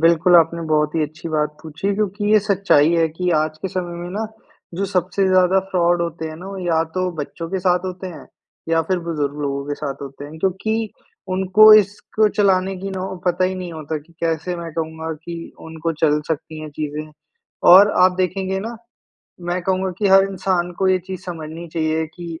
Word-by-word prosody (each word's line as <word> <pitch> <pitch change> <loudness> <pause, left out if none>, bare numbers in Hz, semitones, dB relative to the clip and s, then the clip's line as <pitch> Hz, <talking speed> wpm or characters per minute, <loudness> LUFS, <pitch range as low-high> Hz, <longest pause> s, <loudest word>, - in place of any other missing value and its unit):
बिल्कुल, 170 +2 +5
आपने 165 0 +3
बहुत 150 0 +2
ही 160 - +1
अच्छी 155 +3 -5
बात 150 -2 0
पूछी 165 +6 -3
क्योंकि 205 0 -1
ये 215 - +7
सच्चाई 190 -6 +3
है 165 -1 +3
कि 180 +3 -2
आज 155 0 -4
के 190 - -1
समय 175 -1 -4
में 175 - -6
ना 215 +3 -3 0.5
जो 195 +3 -1
सबसे 185 +2 +1
ज़्यादा 185 0 +4
फ्रॉड 175 -1 +2
होते 165 -1 -4
हैं 155 - -8
ना, 180 +3 -10
वो 195 - -7
या 165 -3 +1
तो 185 -1 0
बच्चों 165 +3 -5
के 190 - -1
साथ 180 0 +2
होते 185 0 -5
हैं 165 -6 -9 0.4
या 165 0 +2
फिर 185 -1 +1
बुजुर्ग 145 -3 -2
लोगों 140 -1 -2
के 145 - -1
साथ 140 -2 -5
होते 140 +1 -8
हैं। 155 +2 -10
क्योंकि 215 +5 -1 0.4
उनको 190 +3 +7
इसको 210 +1 +2
चलाने 190 -1 +2
की 195 +2 -5
नौ 190 -1 -4 0.2
पता 180 +1 +2
ही 185 +1 0
नहीं 180 -2 -6
होता 155 0 -4
कि 160 +3 -20
कैसे 165 +2 -1
मैं 170 -2 -7
कहूँगा 160 0 -4
कि 170 -1 -7
उनको 160 +1 -3
चल 150 -1 +3
सकती 155 0 -4
हैं 155 -1 -7
चीज़ें। 150 +1 -5 0.6
और 200 +3 +9
आप 185 0 +6
देखेंगे 190 +1 -1
ना 230 +3 -6 0.7
मैं 175 +1 -1
कहूँगा 190 +1 0
कि 205 - +2
हर 195 0 +7
इंसान 185 -2 -1
को 190 - +2
ये 185 0 +4
चीज़ 185 -2 -6
समझनी 165 -1 -7
चाहिए 160 0 0
कि 175 - -8
175 Hz, 200 wpm, -20 LUFS, 160-190 Hz, 0.7 s, और